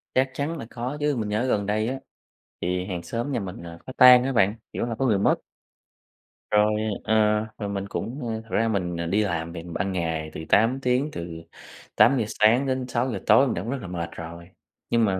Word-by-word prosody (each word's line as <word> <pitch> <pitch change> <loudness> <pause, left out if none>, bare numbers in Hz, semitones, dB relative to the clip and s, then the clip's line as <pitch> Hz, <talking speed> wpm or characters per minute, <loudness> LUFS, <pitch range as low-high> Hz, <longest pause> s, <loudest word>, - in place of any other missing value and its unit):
Chắc 130 +1 +3
chắn 150 +4 -3
là 115 - -6
có 125 +4 -4
chứ, 145 -1 +1
mình 110 -3 -2
nhớ 110 +4 0
gần 100 -4 +1
đây 110 +2 0
á 135 +1 -3 0.6
thì 90 +1 -1
hàng 90 -3 -4
xóm 120 +10 -3
nhà 120 - 0
mình, 90 -3 -7
ờ, 85 0 -9
có 130 - -6
tang 125 0 +8
á 135 - 0
bạn, 100 -2 +3 0.2
kiểu, - - -2
là 115 - -3
có 135 - +1
người 105 -5 +3
mất. - - +3 1.2
Rồi, 105 0 +4 0.3
ờ, 105 0 +2
rồi 100 -2 -4
mình 100 0 -3
cũng, 125 +7 -4
ưm, 110 -2 -3
thật 115 - -21
ra 115 - +2
mình, 90 -5 -1
ờ, 85 - -2
đi 100 +5 +1
làm 85 -3 -2
mình 85 0 -8
ban 95 +2 -1
ngày 80 -3 -2
từ - - -6
8 115 +6 +4
tiếng, 125 +4 +1
từ 85 - -6 0.5
8:00-6:00 125 +2 +3
mình - - -1
cũng 95 +7 -4
rất 140 - -1
là 95 - -7
mệt 85 -1 -4
rồi, 85 +1 -9 0.4
nhưng 115 -1 +3
mà 95 -2 0
105 Hz, 210 wpm, -25 LUFS, 90-125 Hz, 1.2 s, tang